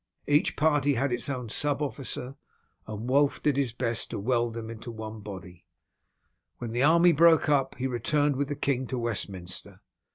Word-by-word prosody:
Each 145 +1 +2
party 145 -2 +2
had 130 +1 0
its 120 - -1
own 125 -4 -4
sub 145 +5 0
officer, 135 -2 -4 0.5
and 110 +2 -6
Wulf 140 +2 +2
did 150 -3 +2
his 135 -4 0
best 120 -1 -1
to - - -4
weld 120 +1 0
them 115 -1 -6
into 115 +1 -8
one 110 -1 -7
body. 95 -4 -10 0.9
When 120 -2 -5
the 120 +2 -1
army 170 +4 +6
broke 165 0 +5
up, 135 -2 +2
he 130 - -4
returned 145 +4 +1
with 140 +1 -1
the 145 - -3
king 135 -2 -1
to 130 - -3
Westminster. 100 -6 -4
130 Hz, 175 wpm, -28 LUFS, 115-145 Hz, 0.9 s, army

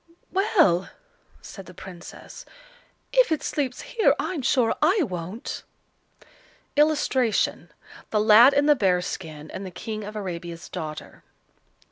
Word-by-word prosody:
"Well!" 375 - +3 0.5
said 195 -2 -10
the 180 - -13
Princess, 180 -1 -11 0.7
"if - - +4
it 315 - 0
sleeps 265 -4 -2
here, 450 - +2
I'm 345 -6 -3
sure 245 -3 +2
I 355 +5 +3
won't." 185 - -5 1.1
[Illustration: 290 -6 +1 0.4
The 215 - +1
Lad 225 +6 +7
in 285 +1 +3
the 295 0 +5
Bear's 180 -6 +1
skin, 155 -3 -7
and 190 - -6
the 190 - -6
King 215 +4 -6
of 210 +1 -8
Arabia's 175 -4 -6
daughter. 155 -1 -7
215 Hz, 125 wpm, -25 LUFS, 180-290 Hz, 1.1 s, Lad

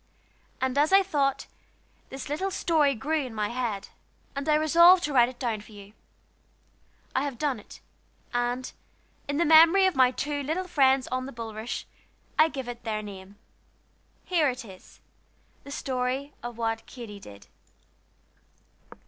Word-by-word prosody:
And 260 +1 0
as 300 +4 +3
I 390 0 +6
thought, 280 -7 0 0.6
this 270 +1 -7
little 310 +7 -2
story 310 -6 +2
grew 300 +6 -1
in 250 -4 -8
my 210 -1 -1
head, 235 -5 -3 0.5
and 280 +2 -3
I 300 - +5
resolved 340 +4 +6
to 295 - -2
write 245 -2 +5
it 255 - -12
down 230 -5 -2
for 215 - -16
you. 200 0 -13 1.2
I 260 - +2
have 280 -4 -4
done 275 -3 -1
it; - - -14 0.5
and, 245 +1 -1 0.6
in 285 0 -2
memory 330 +5 +7
of 375 - +1
my 255 -1 +5
two 285 +3 -3
little 325 +7 -2
friends 265 -5 +3
on 255 0 -2
the - - -7
bulrush, 225 -1 -5 0.6
I 310 - +7
give 265 -5 -6
it 240 0 -7
their 215 -2 -3
name. 195 -1 -10 0.9
Here 330 -6 +2
it 250 -1 -6
is 190 -3 -15 0.6
the - - -10
story 265 +1 -2
of 240 -1 -7
What 225 -1 -2
Katy 225 -5 -9
Did. 100 - -13
260 Hz, 155 wpm, -27 LUFS, 230-300 Hz, 1.2 s, memory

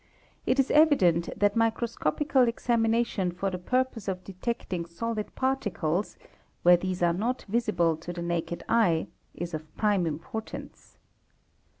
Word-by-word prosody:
it 255 - +3
is 270 - +3
evident 195 - +4
that 205 0 +2
microscopical 235 - +1
examination 230 -4 +1
for 190 +2 -2
the 180 - -4
purpose 250 +1 -1
of 185 -1 -3
detecting 190 -2 -4
solid 210 +6 -4
parti 265 -4 0
cles, 170 +3 -2 0.5
where 175 0 +8
these 180 0 -2
are 170 -1 +4
not 235 +8 -2
visible 195 -7 +1
to 165 +3 -7
the 170 0 -5
naked 170 0 -2
eye, 210 -9 +3 0.3
is 175 0 -5
of 155 0 -7
prime 205 -5 +2
importance. 220 - -7
200 Hz, 135 wpm, -28 LUFS, 175-235 Hz, 0.5 s, where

